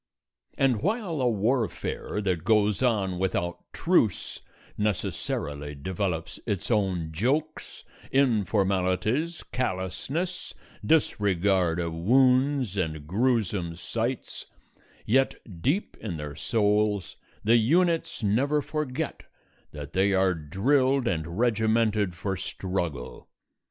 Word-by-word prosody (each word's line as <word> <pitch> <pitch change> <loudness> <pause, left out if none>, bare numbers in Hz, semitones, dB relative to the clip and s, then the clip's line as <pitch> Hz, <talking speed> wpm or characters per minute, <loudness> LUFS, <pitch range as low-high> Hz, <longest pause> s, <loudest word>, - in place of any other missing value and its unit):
And 130 -5 +2
while 195 - -1
a 125 - +3
warfare 110 -1 -1
that 90 -5 -1
goes 105 +1 +3
on 100 -8 +1
without 90 -2 -2
truce 165 - +1 0.4
necessarily 75 -7 -2
develops 85 +2 -3
its 105 +1 -2
own 95 -7 0
jokes, 140 - -2 0.3
informalities, 105 - +1
callousnesses, 125 - -3 0.3
disregard 95 - +2
of 85 -1 -2
wounds 130 - +3
and 80 -5 -2
gruesome 100 - 0
sights, 115 +7 -4 0.6
yet 135 +4 +3 0.3
deep 160 - 0
in 95 -7 -4
their 75 -1 -6
souls 105 +2 +1 0.3
the 115 +3 +5
units 165 +4 +2
never 140 +8 +2
forget 150 0 -3 0.5
that 75 -1 -8
they 95 +1 +3
are 95 -1 +3
drilled 130 - +1
and 85 -3 -2
regimented 110 -4 +2
for 95 +2 -2
struggle. 90 -7 -4
105 Hz, 100 wpm, -27 LUFS, 90-130 Hz, 0.6 s, the